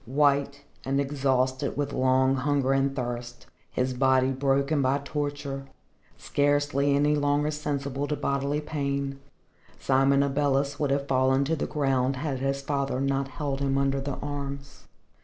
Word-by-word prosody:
White 140 +1 +1 0.2
and 135 +1 0
exhausted 135 -2 0
with 145 -1 -2
long 130 0 +3
hunger 135 0 +1
and 135 0 +1
thirst, 120 -1 -5 0.2
his 130 0 -1
body 130 0 +3
broken 140 +2 +1
by 135 +1 +2
torture, 145 -2 -4 0.5
scarcely 145 -1 +1
any 145 +1 +3
longer 145 +1 +1
sensible 140 -2 -3
to 150 - -1
bodily 140 +1 -1
pain, 140 -2 -3 0.6
Simon 135 +1 +3
Abeles 140 0 0
would 145 - +1
have 140 0 0
fallen 130 0 +3
to 160 +3 0
the 145 - -3
ground 135 -2 +1
had 135 -1 -3
his 135 +1 -1
father 140 -2 -1
not 135 0 0
held 135 +1 -3
him 135 -1 0
under 135 0 +1
the 140 0 -3
arms. 140 -1 -6
140 Hz, 145 wpm, -27 LUFS, 135-145 Hz, 0.6 s, long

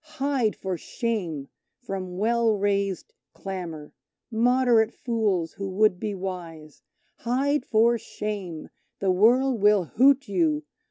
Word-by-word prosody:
Hide 270 -6 +1
for 185 -3 -4
shame 180 - -3 0.3
from 190 -6 -6
well 225 +1 +2
raised 200 -1 -1 0.2
clamour, 170 -6 -7 0.4
moderate 240 -1 +3
fools 210 - -1
who 195 -1 -5
would 190 -1 +2
be 210 0 -3
wise; 170 -5 -7 0.4
Hide 275 +4 0
for 230 +1 +3
shame 195 -8 -6 0.3
the 195 -1 +1
World 235 +5 +3
will 205 -2 +5
hoot 265 - +3
you! 160 -6 +1
205 Hz, 115 wpm, -25 LUFS, 180-235 Hz, 0.4 s, will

